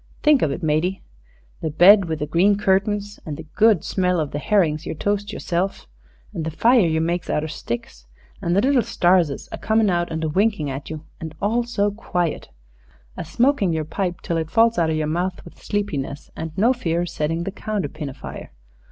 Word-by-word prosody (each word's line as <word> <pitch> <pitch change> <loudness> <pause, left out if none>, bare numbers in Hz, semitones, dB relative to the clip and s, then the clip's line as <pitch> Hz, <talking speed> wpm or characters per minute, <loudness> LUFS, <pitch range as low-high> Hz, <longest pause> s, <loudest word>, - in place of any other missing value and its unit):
Think 300 -3 +5
of 155 - +2
it, 155 +6 -4
matey 160 +5 0 0.6
the 160 - -1
bed 185 +6 +7
with 160 -2 -2
the 150 - -2
green 195 +6 +3
curtains, 205 +1 0
and 150 -2 -6
the - - -9
good 215 -5 +4
smell 180 -2 0
of 150 -3 -2
the 145 - -3
herrings 160 -3 +1
you - - -5
toasts 205 +4 -1
yerself 185 -1 -2 0.5
and 160 - -3
the 160 - -2
fire 230 +5 +4
you 160 0 +1
makes 170 +2 -1
outer 150 +1 0
sticks, 115 - -6 0.3
and 170 +1 0
the 200 - +4
little 270 -1 +4
starses 175 -8 +1
a - - -6
comin' 220 -2 +2
out 175 0 0
and 160 0 -3
a 160 - 0
winkin' 190 -3 +1
at 135 +1 -6
you, 155 0 -7
and 160 -1 -7
all 220 +4 +1
so 205 -4 0
quiet, 180 -5 -3 0.7
a - - -5
smokin' 225 - +1
yer 160 -1 -1
pipe 175 +2 -3
till 170 -3 -2
it 160 -1 -2
falls 230 +2 +3
outer 160 -1 +2
yer 155 -1 0
mouth 175 +4 -2
with 170 - -14
sleepiness, 150 -9 -3
and 160 0 -5
no 230 +6 +4
fear 170 -9 -1
o' - - -1
settin' 165 0 -2
the 195 - -4
counterpin 175 -8 -4
afire. 135 - -9
175 Hz, 200 wpm, -22 LUFS, 155-205 Hz, 0.7 s, bed